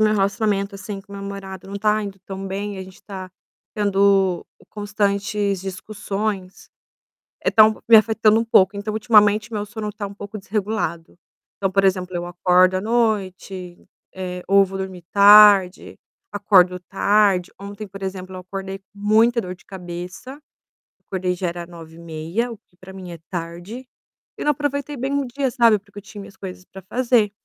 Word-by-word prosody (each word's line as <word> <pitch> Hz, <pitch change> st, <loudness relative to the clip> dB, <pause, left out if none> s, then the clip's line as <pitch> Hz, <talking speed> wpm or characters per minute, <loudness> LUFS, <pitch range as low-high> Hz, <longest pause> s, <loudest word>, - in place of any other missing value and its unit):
meu 215 Hz, 0 st, +4 dB
relacionamento, 200 Hz, 0 st, 0 dB
assim, 195 Hz, 0 st, -7 dB
com 200 Hz, +1 st, -17 dB
meu 200 Hz, 0 st, -7 dB
namorado 195 Hz, -1 st, -8 dB
não 200 Hz, -, -5 dB
tá 215 Hz, +1 st, +2 dB
indo 200 Hz, -1 st, -7 dB
tão 195 Hz, +1 st, -7 dB
bem. 200 Hz, +1 st, -4 dB
A -, -, -5 dB
gente 185 Hz, -1 st, -14 dB
tá 190 Hz, -2 st, -8 dB, 0.4 s
tendo 195 Hz, -3 st, +2 dB, 0.2 s
constantes 205 Hz, -1 st, -1 dB
discussões, 195 Hz, 0 st, -5 dB, 0.7 s
eh, -, -, +2 dB
tá 220 Hz, -, +7 dB, 0.3 s
me 225 Hz, -, +9 dB
afetando 220 Hz, 0 st, +4 dB
um 230 Hz, -, 0 dB
pouco. 200 Hz, -3 st, +4 dB
Então 205 Hz, +1 st, -4 dB
ultimamente 215 Hz, -1 st, +3 dB
meu 205 Hz, -1 st, -2 dB
sono 210 Hz, +1 st, -5 dB
tá 205 Hz, -1 st, -5 dB
um 200 Hz, -, -10 dB
pouco 205 Hz, +1 st, -8 dB
desregulado. 200 Hz, -5 st, -3 dB, 0.4 s
Então, 195 Hz, -1 st, -1 dB
por 195 Hz, +1 st, +2 dB
exemplo, 185 Hz, -1 st, +1 dB
eu 175 Hz, 0 st, -3 dB
acordo 180 Hz, +1 st, +3 dB
à 185 Hz, -, -1 dB
noite, 195 Hz, -5 st, -1 dB, 0.4 s
eh, 180 Hz, -1 st, -5 dB
ou 200 Hz, 0 st, +6 dB
vou 195 Hz, -, -7 dB
dormir 190 Hz, -2 st, -6 dB
tarde, 200 Hz, -2 st, +6 dB, 0.3 s
acordo 185 Hz, -3 st, +4 dB
tarde. 195 Hz, -1 st, +2 dB
Ontem, 200 Hz, +2 st, -8 dB
por 195 Hz, 0 st, -11 dB
exemplo, 190 Hz, -1 st, -5 dB
eu 185 Hz, -, -6 dB
acordei 195 Hz, +1 st, -6 dB
com -, -, -49 dB
muita 220 Hz, +4 st, +3 dB
dor 180 Hz, -3 st, -6 dB
de 185 Hz, -, -22 dB
cabeça. 180 Hz, +8 st, -8 dB, 0.7 s
Acordei 185 Hz, -1 st, -2 dB
já 180 Hz, 0 st, -3 dB
era 170 Hz, 0 st, -5 dB
9:30, 165 Hz, +5 st, -5 dB
o 230 Hz, -, -8 dB
que 200 Hz, -3 st, -36 dB
pra 190 Hz, 0 st, -12 dB
mim 185 Hz, -2 st, -9 dB
é 170 Hz, -, -9 dB
tarde. 175 Hz, +8 st, -6 dB, 0.5 s
E -, -, -4 dB
não 295 Hz, -, +3 dB
aproveitei 290 Hz, 0 st, -2 dB
bem 270 Hz, +3 st, -2 dB
o 280 Hz, 0 st, 0 dB
dia, 265 Hz, +2 st, -2 dB
sabe, 235 Hz, -4 st, +4 dB
porque 205 Hz, 0 st, -15 dB
eu -, -, -9 dB
tinha 210 Hz, -1 st, -11 dB
minhas 200 Hz, -, -12 dB
coisas 185 Hz, -1 st, -9 dB
pra 190 Hz, -, -12 dB
fazer. 235 Hz, +1 st, +1 dB
200 Hz, 175 wpm, -21 LUFS, 185-215 Hz, 0.7 s, me